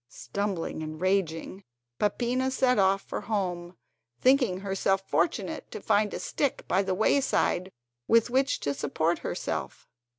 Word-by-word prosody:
Stumbling 170 - -3
and 155 0 -6
raging, 185 0 -1 0.4
Peppina 245 +5 +1
set 255 -3 +2
off 195 0 +3
for - - -5
home, 180 -4 -3 0.4
thinking 250 -8 +3
herself 195 0 0
fortunate 175 +5 -1
to - - -6
find 210 0 +2
a - - -4
stick 285 -3 -2
by 190 - +3
the 190 -1 -1
wayside 195 -4 +1 0.4
with 230 +1 +4
which 270 +2 +2
to 140 - -1
support 160 +4 0
herself. - - -4
195 Hz, 135 wpm, -28 LUFS, 175-230 Hz, 0.4 s, with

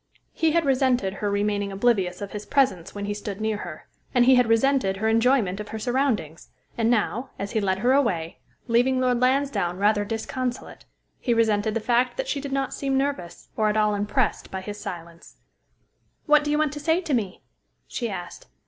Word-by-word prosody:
He 320 -1 +1
had 335 -1 +2
resented 255 -7 +2
her 205 +1 -2
remaining 205 0 0
oblivious 195 -3 +1
of 200 - -7
his 210 0 -7
presence 195 -12 +1
when 200 0 -4
he 205 - -2
stood 205 -1 -6
near 220 -1 -1
her, 170 -6 -8 0.3
and 245 -1 +5
he 260 - +7
had 250 -2 +4
resented 225 -4 +2
her 220 +3 -1
enjoyment 225 -4 +2
of 210 - -6
her 220 - -6
surroundings; 235 - -1 0.3
and 230 -1 +1
now, 240 +2 0
as 200 0 -4
he 220 - 0
led 190 -1 +1
her 245 +6 +2
away, 185 -12 0 0.3
leaving 250 +2 +2
Lord 250 -1 +2
Lansdowne 250 -9 +1
rather 205 +1 +2
disconsolate, 240 +4 -4 0.3
he 240 -3 0
resented 220 -1 +1
the - - +1
fact 245 +3 +1
that - - -2
she 280 - -2
did 280 -1 -6
not 270 0 -1
seem 270 -1 -1
nervous, 270 -11 -3
or 215 -1 +2
at 210 - 0
all 210 -1 +3
impressed 205 +1 -1
by 190 - -5
his 205 +2 -7
silence. 170 -1 -9 0.9
"What 300 0 +5
do 295 - -2
you 295 - +2
want 305 -1 +1
to 295 - -6
say 320 +3 +2
to 325 -5 -3
me?" 205 -7 -2 0.4
she 235 -2 -3
asked. 175 -3 -7
225 Hz, 200 wpm, -25 LUFS, 200-260 Hz, 0.9 s, he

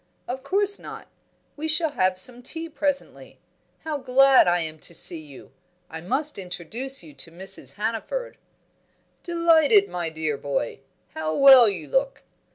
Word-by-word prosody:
"Of 260 +2 -5
course 400 +8 +1
not. - - -11 0.5
We 310 +1 -5
shall 315 0 +3
have 185 -7 0
some 245 +5 +2
tea 325 +6 -7
presently. 290 -2 -4 0.4
How 310 -2 -4
glad 265 -1 +4
I 175 0 +2
am 155 -1 -7
to 170 - -7
see 165 0 +4
you! 145 -4 -14 0.4
I 160 0 -8
must 270 - -2
introduce 195 +8 -3
you 155 -3 -14
to 140 +4 -10
Mrs. 190 +3 -4
Hannaford." 230 - -5 0.8
"Delighted, 335 +3 +3
my 175 -2 -4
dear 155 -2 -4
boy! 140 -4 -4 0.3
How 155 0 -4
well 265 -5 +8
you 200 - -7
look! - - -2
245 Hz, 150 wpm, -23 LUFS, -, 0.8 s, well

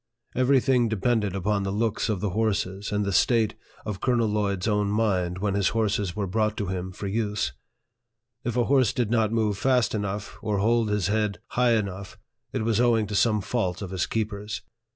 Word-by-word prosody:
Every 130 +2 +4
thing 125 -3 +2
de 110 - -1
pended 105 -2 +1
upon 100 +2 0
the 95 - -2
looks 110 +2 0
of 105 -4 -1
the 105 -3 -1
horses, 100 -1 -1
and 105 0 0
the 100 - -1
state 110 0 +3 0.3
of 105 -3 -4
Colonel 120 -3 +2
Lloyd's 100 -2 -1
own 105 -1 +1
mind 95 -5 0
when 100 +1 -1
his 100 -1 +2
horses 105 -4 0
were 105 -2 -1
brought 105 +3 0
to 105 - -1
him 95 0 -3
for 95 - -7
use. 105 -8 -1 0.9
If 120 0 -2
a 120 - +4
horse 130 -3 +3
did 120 -3 -1
not 110 -2 +2
move 110 -3 0
fast 125 -5 +2
enough, 105 -1 -4
or 105 -2 -1
hold 115 +2 +2
his 105 -3 0
head 105 +1 0
high 125 -1 +3
enough, 100 -3 -3 0.3
it - - -2
was 115 0 +2
owing 115 -3 +3
to 105 0 -5
some 105 0 +3
fault 95 -3 -2
of 95 - -6
his 95 -3 -1
keepers. 105 -1 -3
105 Hz, 200 wpm, -26 LUFS, 100-115 Hz, 0.9 s, Every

